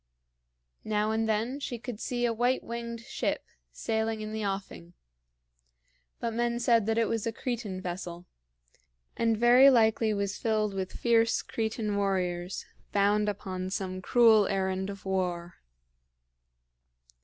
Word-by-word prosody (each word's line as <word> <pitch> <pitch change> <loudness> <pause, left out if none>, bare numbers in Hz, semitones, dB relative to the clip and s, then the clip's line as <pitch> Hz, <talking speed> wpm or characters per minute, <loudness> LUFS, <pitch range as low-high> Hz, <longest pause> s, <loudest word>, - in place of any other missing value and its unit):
Now 215 0 0
and 220 0 0
then 225 +6 0
she 255 -4 -4
could 225 -1 -7
see 245 0 -1
a 235 - +1
white 245 +3 +1
winged 235 0 -5
ship 265 +3 -2 0.3
sailing 220 0 -2
in 215 0 -5
the 220 0 -3
offing; 195 - -5 1.3
but 230 - -2
men 235 +1 0
said 230 -3 +3
that 225 0 +1
it 230 -1 +3
was 225 -1 -1
a - - 0
Cretan 225 -5 -4
vessel, 175 -1 -6 0.9
and 230 -1 +1
very 245 +4 +7
likely 220 -3 +3
was 200 -1 -2
filled 215 -2 0
with 190 -1 -3
fierce 230 -1 +2
Cretan 220 -2 -2
warriors, 185 -2 -1 0.3
bound 205 +1 +2
upon 185 -2 -4
some 190 -2 -3
cruel 220 -1 +5
errand 190 0 -1
of 200 -1 -8
war. 180 -2 -2
215 Hz, 135 wpm, -29 LUFS, 195-230 Hz, 1.3 s, very